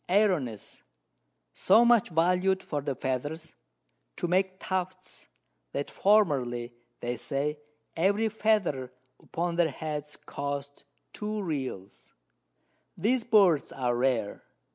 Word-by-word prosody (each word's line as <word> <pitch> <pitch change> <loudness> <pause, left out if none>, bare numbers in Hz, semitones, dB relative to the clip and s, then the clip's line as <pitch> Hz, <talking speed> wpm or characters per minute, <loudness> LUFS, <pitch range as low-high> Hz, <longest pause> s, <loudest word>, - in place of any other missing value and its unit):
Airones, 180 - +1 0.7
so 220 +5 +5
much 235 -3 +4
valued 180 +3 +2
for 145 -2 -3
the 140 -1 -3
Feathers, 145 +5 -4 0.6
to - - -2
make 185 +1 +1
Tufts, 185 0 -4 0.5
that 140 - -3
formerly, 130 - +2 0.3
they 120 0 -2
say, 145 +5 -2 0.4
every 200 +6 +2
Feather 210 - 0 0.3
upon 170 0 -3
their 170 -2 +3
Heads 150 0 -5
cost 140 0 -6 0.3
2 210 0 -3
Reals. 130 - -5 0.8
These 245 +3 +1
Birds 195 -10 +4
are 125 -2 -1
rare. 120 -4 0
165 Hz, 105 wpm, -28 LUFS, 135-190 Hz, 0.8 s, so